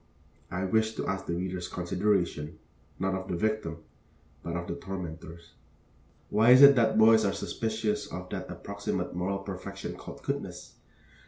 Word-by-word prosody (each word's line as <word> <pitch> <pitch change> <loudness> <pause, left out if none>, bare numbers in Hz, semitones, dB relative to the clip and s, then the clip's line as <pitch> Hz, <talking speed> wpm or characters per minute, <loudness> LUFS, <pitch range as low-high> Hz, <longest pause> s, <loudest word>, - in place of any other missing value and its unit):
I 90 +1 -3
wish 110 +3 +1
to - - -3
ask 95 0 -3
the 85 - -1
reader's 90 0 -3
consideration, 90 -4 -1 0.4
not 95 0 0
of 95 0 -4
the 90 - -2
victim, 85 -5 -2 0.6
but 85 - -4
of 85 0 -3
the - - -2
tormentors. 85 -2 -7 0.8
Why 110 +3 +4
is 130 +2 +9
it 140 0 +10
that 115 -3 +3
boys 110 0 +7
are 100 - +1
suspicious 110 -1 -2
of 90 +1 -6
that - - -5
approximate - - -4
moral 90 +3 -1
perfection 100 0 -6
called - - -10
goodness? - - -4
95 Hz, 155 wpm, -29 LUFS, 85-110 Hz, 0.8 s, it